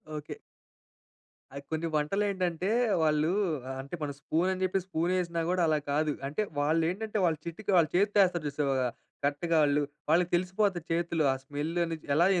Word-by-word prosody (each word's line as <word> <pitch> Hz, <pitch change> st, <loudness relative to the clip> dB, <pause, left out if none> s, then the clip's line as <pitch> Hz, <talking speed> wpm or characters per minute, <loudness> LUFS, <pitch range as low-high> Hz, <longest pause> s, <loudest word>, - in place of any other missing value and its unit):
Okay. 150 Hz, 0 st, -6 dB, 1.2 s
అయి 140 Hz, -, -6 dB
కొన్ని 160 Hz, +1 st, -1 dB
వంటలేంటంటే 185 Hz, +2 st, 0 dB, 0.3 s
వాళ్ళూ 155 Hz, +1 st, +2 dB, 0.5 s
అంటే 140 Hz, +6 st, -7 dB
మనం 145 Hz, -1 st, -2 dB
స్పూన్ 170 Hz, +6 st, +1 dB
అని 185 Hz, -, -6 dB
చెప్పి, 185 Hz, +1 st, +1 dB
స్పూన్ 175 Hz, -1 st, -1 dB
వేసినా 170 Hz, -2 st, -1 dB
కూడా 180 Hz, -1 st, +1 dB
అలా 155 Hz, -1 st, +3 dB
కాదు. 150 Hz, 0 st, +1 dB
అంటే 150 Hz, +9 st, -2 dB, 0.2 s
వాళ్ళేంటంటే 165 Hz, +9 st, 0 dB
వాళ్ళ 160 Hz, -2 st, +1 dB
చిటికి 195 Hz, +5 st, -4 dB
వాళ్ళ 165 Hz, -2 st, +5 dB
చేత్తో 205 Hz, +2 st, +3 dB
వేస్తారు 175 Hz, -4 st, -1 dB
చూసావా? 140 Hz, -1 st, 0 dB, 0.5 s
కరెక్ట్‌గా 160 Hz, +3 st, +1 dB
వాళ్ళు 145 Hz, 0 st, +3 dB, 0.3 s
వాళ్ళకి 175 Hz, +2 st, +3 dB
తెలిసిపోతాయి 185 Hz, -1 st, 0 dB
చేతులు 170 Hz, -1 st, 0 dB
ఆ -, -, -3 dB
స్మెల్ 145 Hz, +3 st, -4 dB
అనేది 165 Hz, -1 st, -6 dB
ఎలా, 170 Hz, +3 st, +5 dB
165 Hz, 155 wpm, -29 LUFS, 150-185 Hz, 1.2 s, వాళ్ళ